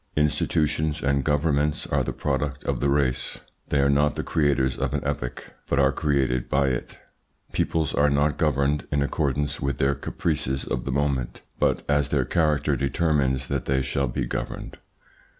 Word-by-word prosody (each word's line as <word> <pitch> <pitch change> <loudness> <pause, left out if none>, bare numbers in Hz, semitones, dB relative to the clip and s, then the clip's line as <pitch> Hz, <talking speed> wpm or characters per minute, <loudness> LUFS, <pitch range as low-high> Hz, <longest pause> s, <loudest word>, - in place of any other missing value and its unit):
Institutions 75 +1 +1
and 70 -1 +2
governments 75 0 +1
are - - 0
the - - -2
product 70 -1 -2
of 70 -3 -1
the 70 - +1
race. 70 -3 0 0.3
They 70 - +2
are 70 - +3
not 75 +1 +3
the - - -2
creators 70 -4 +1
of - - -2
an - - -2
epoch, 60 0 -4 0.2
but 70 - +1
are 70 -1 +4
created 65 -4 0
by 70 0 +2
it. 60 -2 -4 0.5
Peoples 80 -2 0
are 75 0 +3
not 75 +1 +1
governed 75 -1 +1
in 70 -1 +2
accordance 70 -1 -1
with 70 -2 -1
their 70 +1 +2
caprices 70 -1 -2
of 65 -3 -3
the 65 - -2
moment, 65 -3 -1 0.2
but - - +2
as 70 -1 +2
their - - +1
character 75 -3 +1
determines 70 -1 +1
that 70 -2 -2
they 65 -1 +1
shall 70 +1 0
be - - -2
governed. - - -5
70 Hz, 170 wpm, -25 LUFS, 65-75 Hz, 0.5 s, are